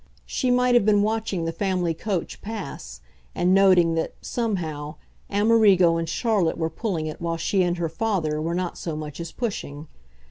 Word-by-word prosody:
She 255 - -1
might 250 0 +3
have 240 - +5
been 205 -1 +4
watching 215 -5 -1
the 165 - -1
family 180 -1 -1
coach 185 0 -4
pass 140 - -7 0.3
and 180 +1 +2
noting 185 -4 +5
that, 165 0 -2
somehow, 160 -10 -3 0.3
Amerigo 200 -5 +4
and 165 -1 -3
Charlotte 200 -4 +1
were 160 -1 -1
pulling 170 -3 -2
it 155 +1 -6
while 165 0 -1
she 190 +4 +1
and 175 -1 +1
her 170 -1 -1
father 165 -4 -1
were 165 +2 -2
not 180 -1 -3
so 165 -3 -4
much 150 -1 -7
as 170 -1 -5
pushing. 160 - -4
175 Hz, 175 wpm, -24 LUFS, 165-210 Hz, 0.3 s, have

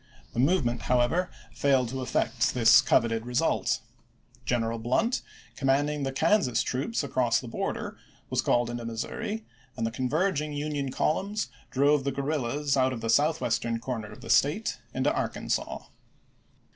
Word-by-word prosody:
The - - -3
move 145 +2 +3
ment, 120 0 -1
however, 125 +9 +2 0.2
failed 135 -4 +2
to 130 +1 -4
effect 125 0 0
this 115 -2 +7
coveted 115 -1 +2
result. 120 +1 0 0.6
G - - +1
eneral 115 -1 -2
Blunt, 220 - +1 0.3
commanding 145 +2 +1
the 135 -1 -1
Kansas 155 - +2
troops 140 - -2
across 125 -4 +1
the 125 - -8
border, 205 - -4 0.3
was 130 0 0
called 120 0 +1
into 120 0 -5
Missouri, 115 - -4 0.3
and 115 - -1
the 115 - -1
converging 150 +5 0
Union 145 -1 -2
columns 200 +10 -1 0.2
drove 140 +1 +3
the 140 - 0
guerrillas 140 0 -1
out 130 -1 +2
of 115 - -6
the 115 0 0
southwest 150 -3 +2 0.2
corner 115 -4 -4
of 105 - -12
the 115 - -3
State 145 - +2
into - - +1
Ar - - 0
kansas. - - -3
135 Hz, 155 wpm, -28 LUFS, 120-150 Hz, 0.6 s, this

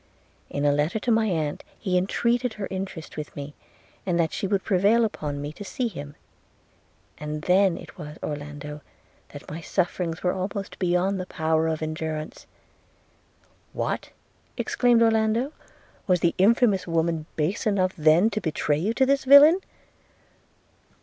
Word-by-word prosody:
In 145 +1 -2
a 145 - +5
letter 150 +7 0
to 235 +3 -1
my 220 -1 +3
aunt 155 -6 -2
he 185 -4 -2
entreated 235 +6 +1
her 200 -2 -5
interest 185 -5 -6
with 150 0 -6
me, 145 0 -7 0.5
and 175 -2 0
that 160 -2 +1
she 195 - -2
would 195 -1 0
prevail 205 +4 +3
upon 150 -9 -4
me 145 +1 -5
to 205 - -9
see 240 +5 -2
him: 145 -8 -8 1.0
and 150 0 -5
then 185 0 +3
it - - -12
was, 150 -2 -8
Orlando, 150 0 -6 0.5
that 145 - -11
my 160 +2 -6
sufferings 175 -1 -2
were 180 - +2
almost 195 +1 -5
beyond 185 +2 +1
the 185 - -5
power 160 -1 0
of 160 -1 -2
endurance.' 155 0 -5 1.3
'What!' - - -3 0.5
exclaimed 240 -2 +3
Orlando, 225 +4 +2 0.6
'was 180 -3 +3
the 170 - +2
infamous 205 -2 +3
woman 165 -1 0
base 165 +8 -1
enough 190 -3 +1
then 165 +6 +4
to 215 +1 -2
betray 150 -3 0
you 210 +8 -1
to 265 - +4
this 275 +1 +2
villain?' 285 +6 +8
180 Hz, 150 wpm, -25 LUFS, 155-210 Hz, 1.3 s, villain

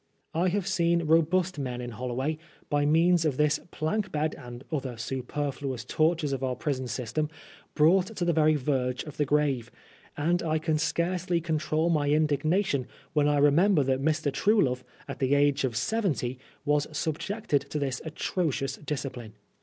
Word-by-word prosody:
I 170 +3 +2
have 190 +1 0
seen 170 -3 +2
robust 165 +2 +2
men 125 -3 -3
in 120 0 -5
HoUoway, 125 +6 -3 0.3
by 145 0 +2
means 165 +2 +4
of 150 -5 0
this 150 -1 +2
plank 190 +7 -2
bed 155 +1 0
and 120 +1 -10
other 135 -6 -3
superfluous 130 +1 -3
tortures 155 0 +1
of 135 -1 -3
our 130 -1 0
prison 130 -1 -2
system, 125 +5 -2 0.5
brought 175 +5 +4
to 175 - -1
the 170 - +2
very 155 -1 +4
verge 130 -3 -1
of 150 - -10
the 150 - +2
grave; 140 -5 +1 0.5
and 170 +4 +1
I 160 -1 0
can 155 -1 0
scarcely 175 +2 0
control 160 0 0
my 145 -3 +1
indignation 155 0 +1 0.3
when 150 -1 +3
I 145 0 +3
remember 150 +4 +4
that 135 0 0
Mr. 155 0 +1
Truelove, 140 - +2 0.2
at 135 - -6
the 135 +1 +2
age 145 0 +3
of 125 -4 -1
seventy, 140 - -1 0.3
was 145 0 +2
subjected 155 +1 -1
to 150 - -3
this 135 -3 -2
atrocious 160 -3 -2
discipline. 130 -7 -5
150 Hz, 160 wpm, -28 LUFS, 135-165 Hz, 0.5 s, means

